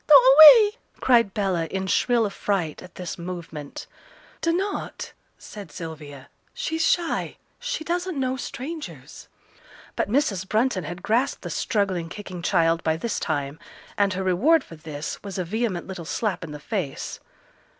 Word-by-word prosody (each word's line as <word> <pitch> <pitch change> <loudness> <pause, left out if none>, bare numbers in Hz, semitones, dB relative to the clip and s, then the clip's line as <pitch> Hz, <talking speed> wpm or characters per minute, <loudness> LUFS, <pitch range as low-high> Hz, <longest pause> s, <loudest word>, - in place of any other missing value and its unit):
do 300 - +9
away!' 315 - +9 0.2
cried 235 -5 +4
Bella, 190 -5 -1
in 190 +3 -3
shrill 235 +4 +2
affright 195 -6 -2
at 180 -1 -13
this 180 -1 -6
movement. 170 -4 -7 0.6
'Dunnot,' 365 +5 -2 0.2
said 200 -7 -10
Sylvia; 150 -4 -8 0.3
'she's 325 -10 -2
shy; 340 0 0 0.2
she - - -3
doesn't 350 -1 -2
know 260 -1 0
strangers.' 280 +4 -7 0.7
But - - -1
Mrs. 205 - 0
Brunton 215 - +1
had 175 +4 -7
grasped 240 +5 0
the - - -5
struggling, 195 -7 -1
kicking 185 -3 -8
child 165 -2 +2
by 160 0 +1
this 230 +6 -2
time, 145 -1 -3 0.4
and 200 -2 +2
her 190 +1 -2
reward 265 - +3
for 165 - -12
this 155 -2 -6
was 200 -2 -7
a 185 - -2
vehement 210 -1 -2
little 185 -3 -7
slap 205 0 -2
in 160 - -7
the 150 - -7
face. 170 -4 -4
195 Hz, 150 wpm, -24 LUFS, 170-260 Hz, 0.7 s, do